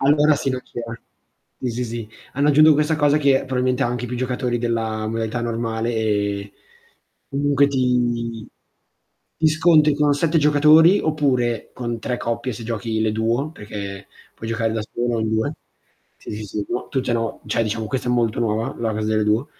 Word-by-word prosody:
Allora 150 +2 +4
sì, 140 -1 -1
non 130 0 -2
c'era. 115 -1 -7 0.7
Sì, 125 - -2
sì, 120 +2 -3
sì. 115 -2 -6 0.3
Hanno 140 +3 +2
aggiunto 155 +2 +7
questa 150 +2 +1
cosa 145 -1 +3
che, 140 -3 +3
probabilmente 125 -1 0
ha - - +2
anche 120 0 -3
più 125 +1 -4
giocatori 125 -1 -1
della 115 -2 -2
modalità 115 +1 -2
normale, 115 0 -2
e 100 -2 -1 0.8
comunque 140 0 +2
ti 120 -4 0 0.9
ti 160 - +3
scontri 155 -1 +4
con 145 0 +2
7 160 +3 +1
giocatori, 150 +5 +6
oppure 130 -7 0
con 120 -2 -4
3 125 +2 -2
coppie 120 +2 -3
se 115 +1 -8
giochi 110 -1 -2
le 110 -1 +1
duo, 115 +7 0
perché 100 -5 -7 0.3
puoi 115 - -7
giocare 115 -1 0
da 110 - -2
solo 120 +2 -2
o - - -1
in 110 - -1
2. 110 +6 0 0.6
Sì, - - -9
sì, 105 +1 -5
sì. 105 0 -4
No, 120 - -3
tutte 130 -3 -1
no, 115 -1 -2
cioè - - +1
diciamo 110 0 -2
questa 125 +1 -3
è - - +2
molto 120 -2 +1
nuova, 110 -1 -1
la 115 -1 -1
cosa 110 0 -2
delle 110 0 +2
duo. 110 +5 +1
120 Hz, 185 wpm, -21 LUFS, 110-140 Hz, 0.9 s, aggiunto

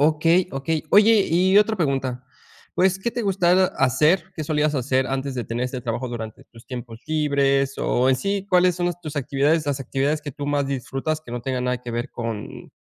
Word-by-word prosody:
Okey 165 +4 +3
okey. 150 +4 -2
Oye, 210 0 +6
y 185 +4 +4
otra 215 +1 +2
pregunta, 135 -5 -1 0.5
pues, 190 +1 +2
¿qué 235 +5 -2
te 240 -1 -3
gustaba 185 -2 +3
hacer? 150 +7 +2
¿Qué 155 - -4
solías 150 0 +1
hacer 130 0 +1
antes 135 0 -3
de 120 - -3
tener 120 +2 -3
este 125 0 -4
trabajo 120 +1 -3
durante 110 -2 -7
tus 115 -1 -18
tiempos 120 -3 -8
libres, 140 -3 +1
o 125 +2 +1
en 130 - +4
sí, 200 +6 -2
cuáles 180 -1 +4
son 175 0 -1
las 175 0 -3
tus 155 -3 -7
actividades 145 +3 +1
las 140 -1 -1
actividades 140 +4 -1
que 145 -3 -6
tú 145 +1 -6
más 145 -1 0
disfrutas, 135 +3 -3
que 140 - -13
no 120 -1 -4
tengan 130 -1 -2
nada 125 0 0
que 120 - -6
ver 120 +3 -3
con, 115 -3 -6
140 Hz, 205 wpm, -23 LUFS, 130-170 Hz, 0.5 s, Oye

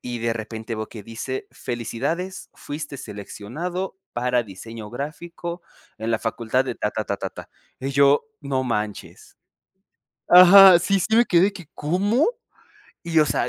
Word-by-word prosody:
Y 120 -1 -5
de 115 0 0
repente 110 +1 -6
veo 110 0 -5
que 110 - -10
dice 115 +5 -6
felicidades, 145 +11 -4
fuiste 145 -1 -7
seleccionado 155 - -6
para 125 0 0
diseño 110 +2 -9
gráfico 170 +6 -6 0.4
en 110 +1 -3
la 110 - +1
facultad 115 +2 0
de 125 -3 -4
Ta, 105 - -1
ta, 110 - -2
ta, 100 - -2
ta, - - -5
ta - - -11 0.3
y 135 - -3
yo: 140 +1 +4 0.2
"No 140 -3 -1
manches". 105 -4 -5 0.9
Ajá, 185 +1 +10
sí, 195 +2 +1
sí, 220 +5 +1
me 235 - +6
quedé 190 +2 +3
¿que 175 -6 -11
cómo? 200 - +1 0.8
Y, 165 -1 +4
o 150 - +5
sea, 125 - 0
130 Hz, 155 wpm, -23 LUFS, 115-175 Hz, 0.9 s, Ajá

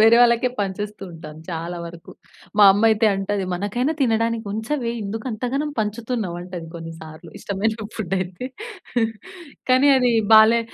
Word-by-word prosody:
వేరే 225 +2 +7
వాళ్ళకే 235 +1 +4
పంచేస్తూ 205 +1 -4
ఉంటాను 155 -1 -10
చాలా 170 +1 -4
వరకు. 170 0 -11 0.5
మా 205 - +9
అమ్మయితే 220 +1 +3
అంటది, 195 0 -2
"మనకైనా 210 - -1
తినడానికి 230 -3 +1
ఉంచవే, 230 +3 -2
ఎందుకు 215 +2 -5
అంత 215 +1 -7
గనం 295 +2 -1
పంచుతున్నావు?" 220 -3 -2
అంటది 180 -2 -7
కొన్నిసార్లు 165 0 -9
ఇష్టమైన 210 +3 -1 0.2
ఫుడయితే. 185 +2 -3 1.2
కానీ, 260 +3 +5
అది 250 -2 +3 0.2
బాలే 220 +2 +7
210 Hz, 130 wpm, -22 LUFS, 180-230 Hz, 1.2 s, మా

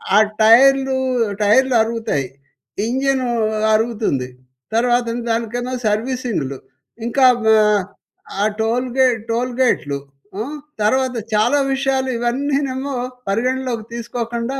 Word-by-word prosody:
ఆ - - +7 0.2
టైర్లూ, 265 +4 +5 0.5
టైర్లరుగుతాయి. 225 - +2 0.6
ఇంజనూ 265 +1 0 0.4
అరుగుతుంది. 215 - 0 0.5
తర్వాతను 240 0 +1
దానికన్నా 235 +2 -2
సర్వీసింగ్‌లు. 215 - -2 0.5
ఇంకా 260 +3 +3 0.2
మ 220 - 0 0.9
ఆ 210 - +3 0.2
టోల్‌గే 250 +3 +1 0.2
టోల్‌గేట్‌లూ. 240 - 0 0.4
హ్మ్, 265 +8 -4 0.3
తర్వాత 260 +3 +1 0.2
చాలా 225 +7 +3 0.2
విషయాలు 265 -1 0
ఇవన్నీనేమో 275 +2 -1 0.4
పరిగణనలోకి 245 +1 -1
తీసుకోకుండా 235 +2 -4
240 Hz, 80 wpm, -19 LUFS, 225-260 Hz, 0.9 s, ఆ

